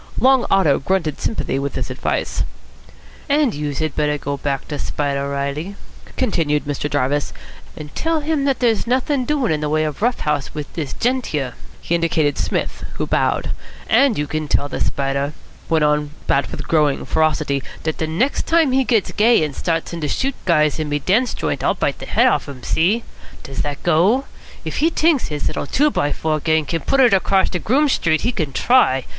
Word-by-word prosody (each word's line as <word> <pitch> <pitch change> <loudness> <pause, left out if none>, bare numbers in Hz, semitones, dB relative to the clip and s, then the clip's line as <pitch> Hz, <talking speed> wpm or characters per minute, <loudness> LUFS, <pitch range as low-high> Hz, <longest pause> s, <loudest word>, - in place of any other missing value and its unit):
Long 260 -1 +4
Otto 185 -8 +3
grunted 165 0 -1
sympathy 215 -10 -1
with 140 +1 -3
this - - -4
advice. - - -2 0.9
"And 285 -5 +3
youse 145 -2 -3
had 155 -2 -2
better 150 -1 +1
go 140 0 -3
back 140 -1 -3
to 150 - -4
Spider 140 -1 -2
Reilly," 140 +7 -3 0.4
continued 160 - 0
Mr. 145 0 -2
Jarvis, 145 +1 0 0.4
"and 150 -1 -9
tell 325 -1 0
him 295 -2 0
that 275 -2 +2
there's 230 -2 +2
nothin' 255 +2 +1
doin' 280 - 0
in 155 -1 0
the 150 - -1
way 155 +1 +2
of 150 +2 -4
rough 240 +2 +1
house 150 -1 -2
wit 150 -1 -3
dis 150 -5 -4
gent 250 +1 0
here." 135 -5 -2 0.3
He - - -3
indicated 160 -3 +1
Psmith, - - -2
who - - -2
bowed. - - 0 0.4
"And 275 -6 +4
you 150 - 0
can 155 +1 -3
tell 145 - +1
de - - -5
Spider," 140 +1 -1 0.4
went 160 -2 +3
on 150 0 +2 0.2
Bat 140 - +1
with 145 - -6
growing 150 -4 +2
ferocity, 155 -3 +1 0.2
"dat 160 0 -3
next 235 - 0
time 325 -4 +3
he 265 +1 +3
gits 230 -5 +1
gay 225 -3 +4
and 150 -3 -3
starts 165 0 -2
in 170 - -5
to 150 - -1
shoot 270 - -1
guys 155 -3 +2
in 155 -1 -2
me 145 - +1
dance 215 - +1
joint - - -2
I'll - - +2
bite - - -1
de - - -8
head - - +3
off'n 140 - +1
him. 125 - -15
See? 200 +9 +1 0.4
Does 135 - -7
dat 145 -1 -3
go? 185 - +3 0.4
If - - -4
he 320 - +3
t'inks 320 -4 +2
his 150 -1 -4
little - - -2
two 295 - +2
by 145 - 0
four 155 +1 -1
gang 160 0 +1
can 165 +3 -2
put 270 - +2
it 245 -5 +5
across 195 0 +2
de 180 - -2
Groome 280 - +2
Street, 160 - +1
he 240 - +1
can 160 - -2
try. 135 - +3
160 Hz, 200 wpm, -20 LUFS, 145-240 Hz, 0.9 s, it